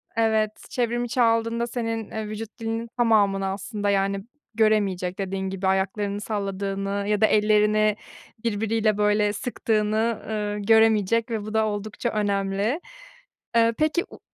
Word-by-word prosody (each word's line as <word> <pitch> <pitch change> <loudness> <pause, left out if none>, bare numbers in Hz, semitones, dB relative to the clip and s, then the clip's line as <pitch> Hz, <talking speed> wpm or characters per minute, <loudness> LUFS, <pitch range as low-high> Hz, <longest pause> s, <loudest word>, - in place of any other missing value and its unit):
evet, 220 -1 +2
çevrim 240 -1 -1
içi 245 +1 -1
aldığında 230 0 +2
senin, 225 -2 -3
eee, 220 -1 -4
vücut 215 +2 -7
dilinin 225 +1 -3
tamamını 205 -5 +3
aslında, 205 +2 -3
yani, 195 0 +1 0.3
göremeyecek, 200 -5 +1
dediğin 190 0 -2
gibi 190 0 -2
ayaklarını 200 +2 0
salladığını 200 -1 -3
ya 210 0 +1
da - - +7
ellerini 215 0 +3 0.5
birbiriyle, 220 -1 +1
böyle, 210 0 +2
sıktığını, 220 0 0
ııı, 210 -1 -2
göremeyecek 220 +1 +3
ve 220 -2 -1
bu 215 - -6
da 220 0 +3
oldukça 215 +2 -3
önemli. 200 - 0 0.8
Eee, 230 0 +4
peki, 310 +3 +1
u - - -13
215 Hz, 135 wpm, -24 LUFS, 200-225 Hz, 0.8 s, da